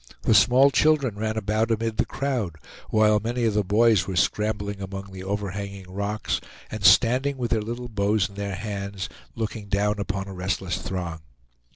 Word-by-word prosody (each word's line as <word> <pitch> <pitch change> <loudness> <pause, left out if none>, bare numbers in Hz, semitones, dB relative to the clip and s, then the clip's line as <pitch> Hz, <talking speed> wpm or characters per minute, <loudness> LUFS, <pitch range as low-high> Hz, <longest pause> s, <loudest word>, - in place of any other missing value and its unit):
The - - +3
small 130 +6 +6
children 140 -2 +3
ran 110 +1 -2
about 110 +2 0
amid 115 0 -1
the - - +1
crowd, 125 - -2 0.3
while 110 -1 +4
many 120 +3 -2
of 110 -2 +2
the 105 0 +2
boys 105 +1 +3
were 95 - -3
scrambling 100 +1 0
among 95 0 -6
the 95 0 -8
overhanging 100 -1 -4
rocks, 100 +2 -2 0.3
and 110 - -5
standing, 125 +8 +5
with 120 -2 -3
their 110 - +2
little 120 +3 -5
bows 105 -2 +1
in 100 - -16
their 100 -1 -4
hands, 100 -2 -5 0.3
looking 110 -2 -4
down 105 +1 +1
upon 95 -1 -3
a 95 - -7
restless 95 0 -2
throng. 85 -4 -4
105 Hz, 175 wpm, -25 LUFS, 100-115 Hz, 0.3 s, small